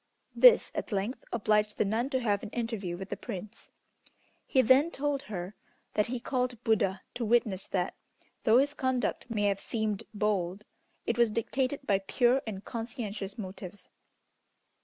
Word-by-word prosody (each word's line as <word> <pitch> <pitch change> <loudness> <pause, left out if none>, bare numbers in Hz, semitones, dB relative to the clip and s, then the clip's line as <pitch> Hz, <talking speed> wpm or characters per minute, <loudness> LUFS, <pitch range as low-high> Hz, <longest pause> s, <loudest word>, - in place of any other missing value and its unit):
This - - +7
at - - -4
length 205 +5 -2
obliged 210 -2 +1
the - - +2
nun 225 +6 0
to 260 -2 +1
have 205 -4 +1
an 215 - -6
interview 220 -7 -3
with 190 +1 -7
the - - -2
Prince. 210 -3 -8 0.8
He 260 - +4
then 265 +7 +5
told 285 -3 -1
her 185 -1 -4 0.4
that 210 - +2
he 245 +1 -3
called 250 0 -1
Buddha 195 -4 +1
to 240 - -3
witness 215 -4 +2
that, 180 -2 -1 0.5
though 230 -1 +6
his 285 +2 +3
conduct 260 -3 -1
may 210 -3 -1
have 200 -1 +2
seemed 215 -3 -2
bold, 205 -2 -1 0.4
it - - -1
was 235 -1 +5
dictated 260 +5 -1
by 200 -5 +3
pure 245 +6 +2
and 200 -2 -5
conscientious 225 -4 -5
motives. 190 -1 -8
220 Hz, 160 wpm, -30 LUFS, 200-250 Hz, 0.8 s, This